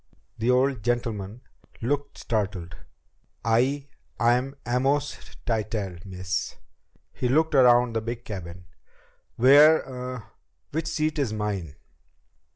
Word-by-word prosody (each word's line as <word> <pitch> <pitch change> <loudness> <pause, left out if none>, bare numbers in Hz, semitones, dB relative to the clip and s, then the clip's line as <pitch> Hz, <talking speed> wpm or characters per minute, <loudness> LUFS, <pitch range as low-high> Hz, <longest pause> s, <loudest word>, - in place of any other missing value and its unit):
The 115 +2 0
old 130 -1 +3
gentleman 115 -2 -2 0.4
looked 140 +4 -2
startled. 100 -6 -3 0.7
"I 130 +5 +2 0.3
I'm 125 +4 +2
Amos 135 +4 -1
Tytell, 105 -5 -2
miss." 90 0 -3 0.6
He 125 - -1
looked 155 +4 +2
around 125 -3 +5
the 115 - 0
big 120 +1 -5
cabin. 90 -3 -7 0.7
"Where 145 +6 +7
uh, 125 -1 -6 0.5
which 160 +2 -2
seat 155 -1 -1
is 125 -7 0
mine?" 100 -8 -3
120 Hz, 105 wpm, -26 LUFS, 105-135 Hz, 0.7 s, Where